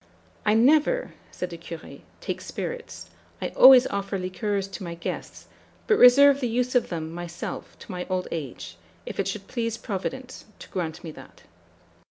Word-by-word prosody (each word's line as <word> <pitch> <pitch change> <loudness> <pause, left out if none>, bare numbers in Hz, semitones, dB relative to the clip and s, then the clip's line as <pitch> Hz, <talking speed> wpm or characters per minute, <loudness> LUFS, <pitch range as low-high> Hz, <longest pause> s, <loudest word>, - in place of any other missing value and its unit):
"'I 210 - +5
never,' 305 - +3 0.2
said 180 0 -5
the 170 - -8
Curé, 165 -1 -9 0.2
'take - - -4
spirits; 485 0 -6 0.3
I - - -2
always 260 -1 +8
offer 200 0 -2
liqueurs 195 +2 -2
to 195 - -7
my 170 -1 -5
guests 170 - -6 0.4
but 430 - +4
reserve 280 +3 +8
the 250 - -1
use 245 +2 0
of 250 - +2
them, 160 -1 -4
myself, 175 0 -7
to - - -11
my 180 -1 -5
old 185 -1 -1
age, 145 -7 -6 0.3
if - - -7
it - - +1
should 200 -2 -4
please 230 -2 -2
Providence 250 +4 -5
to - - -12
grant 165 -2 -4
me 165 - -6
that.' - - -15
200 Hz, 165 wpm, -25 LUFS, 175-250 Hz, 0.4 s, always